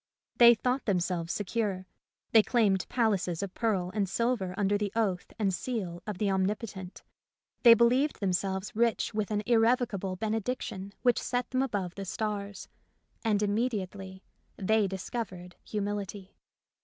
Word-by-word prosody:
They 235 0 +9
thought 250 +4 -1
themselves 175 -4 0
secure; 205 -2 -2 0.5
they 225 - +8
claimed 210 -5 +1
palaces 200 -7 0
of 190 -2 -5
pearl 195 -6 0
and 200 -3 0
silver 230 -5 0
under 205 0 +2
the 205 -1 -1
oath 195 -6 -1
and 200 -4 +1
seal 180 -5 -3
of 210 -3 -4
the 200 0 +1
Omnipotent; 190 -1 -3 0.6
they 235 -2 +9
believed 250 +6 +3
them 195 -3 0
selves 190 +2 -2
rich 230 0 +1
with 210 -1 -1
an 210 -1 -1
irrevocable 225 -5 +2
benediction 215 -1 -3
which 245 -2 +3
set 245 0 -2
them 255 0 +1
above 200 -9 -2
the 195 0 -6
stars; 205 0 -4 0.6
and 210 -3 +2
im 205 -1 +1
mediately 195 -4 -3 0.3
they 215 +1 +2
discovered 190 -2 -5
humility. 205 -2 -4
205 Hz, 145 wpm, -29 LUFS, 190-230 Hz, 0.6 s, They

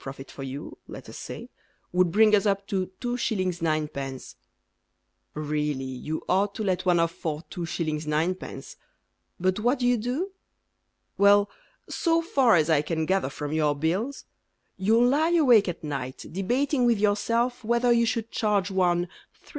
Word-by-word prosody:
profit 135 0 -9
for - - -10
you, 135 +1 -6
let - - -10
us - - -9
say, - - -7 0.4
Would 180 -1 +2
bring 215 +3 +5
us 210 +1 +1
up 200 0 0
to 185 -2 -1
2s. 220 -8 -1
9d. 150 -5 -3 1.0
Really 150 -2 -2
you 130 +4 -5
ought 200 +2 +1
to 220 - -3
let 185 -2 -1
one 175 -1 +4
off 165 0 +2
for 155 -1 -4
2s. 160 -3 -3
9d., 170 - -2 0.6
But 185 +2 +1
what 245 +6 +2
do 250 - -1
you 245 0 +3
do? 255 - -2 0.9
Well, 200 0 +5 0.4
So 330 -1 +1
far 265 - +4
as 155 -2 +3
I 160 -3 +3
can 160 +1 -2
gather 190 -5 +1
from 145 +1 -5
your 150 -2 +2
bills, 185 - -2 0.5
You 215 +5 +2
lie 310 +7 +3
awake 245 - +5
at 170 - -6
night 135 -4 -5
Debating 250 - 0
with 235 -2 +3
yourself 230 +4 0
Whether 235 +2 +2
you 235 0 +3
should 230 -1 -2
charge 205 -3 0
one 175 -2 +2 0.4
3s. - - -19
190 Hz, 160 wpm, -26 LUFS, 155-230 Hz, 1.0 s, bring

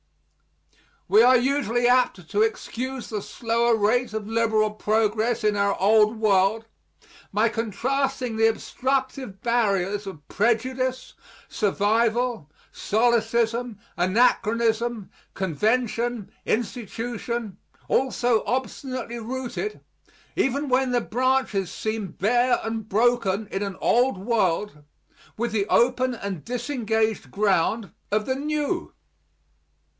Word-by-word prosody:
We 215 - +6
are 255 +1 +7
usually 245 -2 +1
apt 245 -9 +2
to 205 +1 +1
excuse 245 +3 -2
the 210 -2 -3
slower 235 +2 0
rate 225 +2 +1
of 215 -1 -4
liberal 220 -2 +2
progress 220 +2 0
in 210 -1 +2
our 200 0 +1
Old 215 +3 +4
World 215 +1 +2 0.7
by 215 +3 +3
contrasting 250 +3 -2
the 225 0 +5
obstructive 260 -2 -2
barriers 205 -4 0
of 155 -7 -9
prejudice, 255 +4 0 0.4
survival, 220 - 0 0.2
solecism, 235 0 +1 0.2
anachronism, 225 +3 +1 0.2
convention, 225 - -1
institution, 235 -1 -3 0.3
all 265 +1 +2
so 240 -3 +1
obstinately 255 -1 -3
rooted, 260 - -4 0.5
even 280 +3 0
when 255 0 +2
the 245 -1 +2
branches 245 -6 0
seem 215 -2 -3
bare 245 +4 +2
and 225 -1 -4
broken, 220 -2 +1
in 195 - -4
an 200 -2 -3
old 245 -2 +3
world, 195 -5 0 0.6
with 235 +1 -1
the 205 -2 0
open 255 +2 +2
and 195 -7 -5
disengaged 230 -3 -1
ground 200 0 +1 0.2
of 210 0 +1
the 260 - -1
new. 295 +1 -2
230 Hz, 105 wpm, -24 LUFS, 210-245 Hz, 0.7 s, are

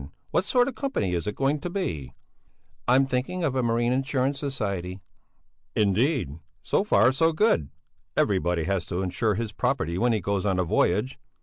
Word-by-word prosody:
What 185 - +1
sort 245 +2 +3
of - - -1
a 255 - -17
company 260 - -1
is 85 +2 -2
it 105 - -2
going 140 +2 +1
to 175 - -4
be?" 85 - -4 0.7
"I'm 130 +2 +5
thinking 135 +8 -2
of 140 -5 0
a 130 - +2
marine 120 +1 +1
insurance 135 +1 0
society." 100 -10 -3 0.8
"Indeed! 105 - +1 0.2
So - - +1
far 110 +6 +4
so 160 +5 +3
good; 155 - +2 0.5
everybody 90 -4 +1
has 95 0 0
to 90 +1 -3
insure 105 +3 0
his 110 0 -3
property 85 -2 -1
when 120 +1 +3
he 110 - +1
goes 100 +1 -1
on 95 -3 +1
a 90 - +2
voyage. 100 +8 +1
115 Hz, 180 wpm, -26 LUFS, 95-135 Hz, 0.8 s, I'm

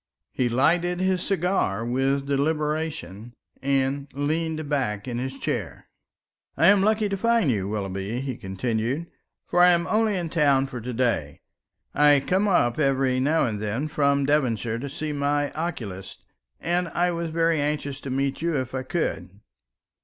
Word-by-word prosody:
He 125 -1 0
lighted 170 +8 +2
his 185 -1 +1
cigar 180 - 0
with 135 +3 0
deliberation 145 - -2 0.3
and 135 +1 0
leaned 155 +2 -1
back 130 -7 -1
in 120 -1 -3
his 130 +1 -4
chair. - - -4 0.7
"I 165 - +6
am 200 -1 +5
lucky 215 +1 +2
to 200 - -2
find 230 - +2
you, 100 -4 -1
Willoughby," 100 +2 -3
he 130 -2 -4
continued, 115 - -2 0.4
"for 175 - 0
I 180 - +8
am 170 -1 +3
only 215 +2 +1
in 170 -2 -3
town 140 -4 +3
for 125 -3 -7
to 125 +3 -5
day. 115 - -1 0.5
I 145 0 +5
come 190 +9 +1
up 155 -10 +2
every 135 -3 +2
now 150 +5 +2
and 110 -4 -2
then 110 +8 -2
from 140 -2 +1
Devonshire 120 -6 0
to 140 +3 -5
see 155 +2 -4
my 145 0 0
oculist, 115 - -6 0.3
and 175 +1 0
I 175 +1 0
was 170 -1 -3
very 165 -1 +1
anxious 145 -2 -2
to 135 - -7
meet 135 +2 -1
you 170 -1 0
if 130 -1 -3
I 130 - -2
could. 130 - -2
140 Hz, 160 wpm, -25 LUFS, 125-165 Hz, 0.7 s, I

